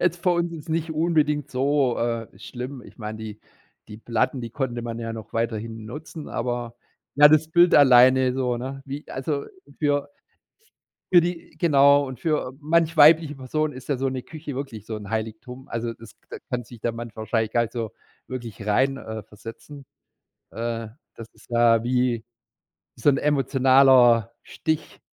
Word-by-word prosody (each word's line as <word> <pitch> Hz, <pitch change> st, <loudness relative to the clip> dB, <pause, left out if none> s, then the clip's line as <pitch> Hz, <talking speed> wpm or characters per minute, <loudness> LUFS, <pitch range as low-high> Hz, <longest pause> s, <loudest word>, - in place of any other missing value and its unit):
Jetzt 175 Hz, 0 st, 0 dB
für 180 Hz, -, +3 dB
uns 170 Hz, -1 st, 0 dB
jetzt 160 Hz, 0 st, -9 dB
nicht 160 Hz, 0 st, -1 dB
unbedingt 150 Hz, -3 st, +1 dB
so, 135 Hz, -1 st, +1 dB
äh, 115 Hz, -1 st, -1 dB
schlimm. 125 Hz, +1 st, -8 dB
Ich -, -, -16 dB
meine, 110 Hz, 0 st, -6 dB
die 110 Hz, -1 st, -8 dB, 0.5 s
die 105 Hz, 0 st, -10 dB
Platten, 120 Hz, +3 st, -1 dB
die 115 Hz, -, -6 dB
konnte 120 Hz, -1 st, -3 dB
man 115 Hz, -1 st, -5 dB
ja 115 Hz, -1 st, -4 dB
noch 110 Hz, -1 st, -9 dB
weiterhin 115 Hz, -1 st, -3 dB
nutzen, 150 Hz, +5 st, -8 dB
aber, 120 Hz, -1 st, -3 dB, 0.4 s
ja, 145 Hz, +1 st, +8 dB
das 155 Hz, +1 st, +4 dB
Bild 175 Hz, +1 st, +4 dB
alleine 130 Hz, -1 st, +6 dB
so, 125 Hz, -2 st, -1 dB
ne? 135 Hz, +3 st, -6 dB
Wie 140 Hz, +2 st, -7 dB
also 140 Hz, +2 st, -3 dB, 0.3 s
für 145 Hz, -2 st, 0 dB, 1.1 s
für 175 Hz, -, +9 dB
die 170 Hz, -2 st, -5 dB
genau. 140 Hz, -3 st, +5 dB
Und 130 Hz, -2 st, -8 dB
für 155 Hz, -4 st, 0 dB
a -, -, -10 dB
manch 165 Hz, +2 st, +1 dB
weibliche 155 Hz, 0 st, +6 dB
Person 150 Hz, +4 st, -2 dB
ist 130 Hz, 0 st, -11 dB
ja 140 Hz, -, +1 dB
so 135 Hz, +1 st, -1 dB
'ne 130 Hz, -1 st, -4 dB
Küche 150 Hz, -1 st, -8 dB
wirklich 125 Hz, -7 st, -6 dB
so 110 Hz, -, -4 dB
'n 105 Hz, -2 st, -9 dB
Heiligtum. 115 Hz, +5 st, -5 dB
Also, 115 Hz, 0 st, -3 dB
das 110 Hz, -1 st, -15 dB
da -, -, -7 dB
kann 120 Hz, -1 st, -2 dB
sich 115 Hz, -1 st, -14 dB
der 120 Hz, -, -1 dB
Mann 115 Hz, 0 st, -7 dB
wahrscheinlich 110 Hz, 0 st, -2 dB
gar 120 Hz, -, +2 dB
nicht 115 Hz, -, -5 dB
so 115 Hz, -4 st, -4 dB, 0.3 s
wirklich 115 Hz, -4 st, -7 dB
rein 130 Hz, +6 st, +2 dB
äh, 110 Hz, -4 st, -7 dB
versetzen. 115 Hz, +7 st, -12 dB, 0.6 s
Äh, 115 Hz, 0 st, -4 dB, 0.3 s
das 115 Hz, -, -10 dB
ist -, -, -21 dB
ja 115 Hz, -1 st, +4 dB
wie 125 Hz, -1 st, 0 dB, 0.7 s
so -, -, 0 dB
'n 140 Hz, -, +5 dB
emotionaler 130 Hz, -4 st, +4 dB
Stich. 155 Hz, -1 st, -4 dB
130 Hz, 175 wpm, -24 LUFS, 115-145 Hz, 1.1 s, für